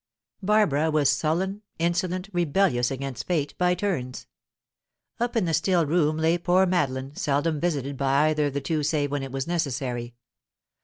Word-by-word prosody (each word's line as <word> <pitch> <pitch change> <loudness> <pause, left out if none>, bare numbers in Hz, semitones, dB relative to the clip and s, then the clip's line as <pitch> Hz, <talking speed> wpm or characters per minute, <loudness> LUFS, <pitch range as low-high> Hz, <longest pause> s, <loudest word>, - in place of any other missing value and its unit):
Barbara 185 -7 +2
was 150 -3 +3
sullen, 170 +8 -1 0.2
insolent, 175 +2 -1
rebellious 170 -7 +2
against 135 -2 -5
fate, 155 -5 -1
by 180 0 +3
turns. 165 -11 -3 0.9
Up 240 +1 -1
in 220 -5 +2
the 165 - -1
still 170 +1 +2
room 155 0 +1
lay 165 +2 +2
poor 180 +2 +3
Madeline, 140 -6 -1
seldom 145 +2 0
visited 140 -5 -2
by 140 +3 +3
either 150 -1 +1
of 140 - -4
the 140 - -1
two 155 +2 -1
save 145 -1 0
when 145 -1 -1
it 135 -1 -6
was 135 0 -3
necessary. 130 -8 -3
155 Hz, 160 wpm, -25 LUFS, 140-175 Hz, 0.9 s, was